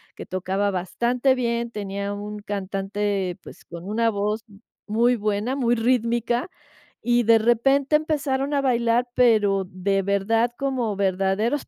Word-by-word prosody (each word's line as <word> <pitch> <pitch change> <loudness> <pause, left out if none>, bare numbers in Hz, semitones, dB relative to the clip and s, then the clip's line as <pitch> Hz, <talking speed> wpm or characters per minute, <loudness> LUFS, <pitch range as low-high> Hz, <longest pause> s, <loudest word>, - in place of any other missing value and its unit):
que - - -8
tocaba 190 +2 -1
bastante 240 +8 0
bien, 235 -1 -1
tenía 200 -1 -4
un 210 +1 -6
cantante, 195 -1 -2
pues, - - -13
con 170 0 -9
una 230 +2 +1
voz 210 +1 -2
m 200 -1 -17 0.3
muy 235 +4 +3
buena, 215 +3 -1
muy 240 -3 +2
rítmica, 240 - 0 0.5
y 240 0 +2
de 230 0 +6
repente 270 +6 +3
empezaron 290 -2 0
a 280 - +2
bailar, 240 -2 +1
pero 210 -6 +3
de 195 +2 0
verdad 200 +4 +1
como 255 -6 -1
verdaderos 195 +7 0
225 Hz, 140 wpm, -23 LUFS, 200-245 Hz, 0.5 s, de